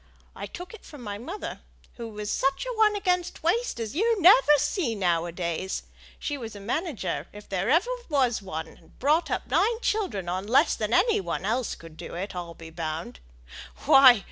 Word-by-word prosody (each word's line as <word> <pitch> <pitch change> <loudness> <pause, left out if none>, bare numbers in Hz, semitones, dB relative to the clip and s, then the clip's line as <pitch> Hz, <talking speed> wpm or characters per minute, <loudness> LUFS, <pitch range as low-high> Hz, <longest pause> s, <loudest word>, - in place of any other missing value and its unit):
I - - -6
took 355 +3 -9
it 450 - -12
from 290 -5 -11
my 205 -2 -5
mother, 345 - -6 0.4
who 230 -2 -6
was 210 -1 -5
such 275 - 0
a - - -4
one 430 -1 +4
against 360 -5 -1
waste 440 - 0
as 225 +3 -4
you 450 +4 +2
never 335 -6 +7
see 295 - 0
now 175 -4 +1
a - - -5
days. 175 +2 -3 0.3
She 290 -2 -4
was 225 -3 -7
a - - -8
manager, 230 - -3
if 205 -1 -12
ever 190 0 0
there 330 - +5 0.3
was 255 -7 +2
a - - -17
one; 160 -3 -4
and 160 +1 -19
brought 300 +6 +2
up - - -2
nine 455 +1 +2
children 250 - -1
on 185 +3 -3
less 265 +8 +4
than 215 0 -2
any 420 - +3
one 190 - -3
else 235 +3 -1
could 165 -1 -13
do, - - -8
I'll 175 -2 -5
be 165 -1 -11
bound. 160 -4 -5 0.7
Why! 260 -4 +8
235 Hz, 195 wpm, -26 LUFS, -, 0.7 s, Why